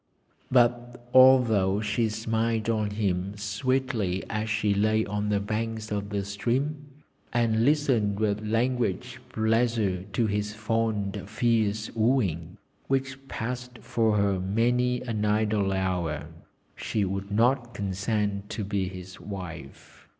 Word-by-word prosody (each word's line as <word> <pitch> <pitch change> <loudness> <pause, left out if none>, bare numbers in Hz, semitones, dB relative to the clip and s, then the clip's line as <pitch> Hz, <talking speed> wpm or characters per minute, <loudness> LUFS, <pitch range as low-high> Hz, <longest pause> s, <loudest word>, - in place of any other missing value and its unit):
But 120 0 +1
although 120 -7 +6
she 110 +2 0
smiled 115 +1 0
on 110 -2 0
him 100 -1 -1
sweetly 105 -1 -1
as 110 0 -2
she 105 -1 +1
lay 110 +2 +2
on 105 +1 -2
the 105 -1 +2
banks 110 +1 -3
of 100 -1 -2
the 100 -1 -2
stream, 135 +9 -2 0.4
and 115 -2 +2
listened 125 -8 +2
with 105 -1 0
languid 115 -1 0 0.2
pleasure 110 -4 +1
to 115 - +1
his 105 0 -2
fond 110 -2 -1
fierce 110 -2 +1
wooing, 105 - 0 0.3
which 135 0 -2
passed 125 +1 -5
for 110 -2 +1
her 100 -2 +2
many 120 +6 +1
an 110 -4 -2
idle 105 -2 +1
hour, 90 -5 -1 0.5
she 105 -2 -1
would 95 +1 -3
not 120 +3 +1
consent 100 +1 -2
to 110 - -3
be 100 -1 -1
his 90 0 -10
wife. 90 -8 -9
110 Hz, 125 wpm, -27 LUFS, 100-120 Hz, 0.5 s, although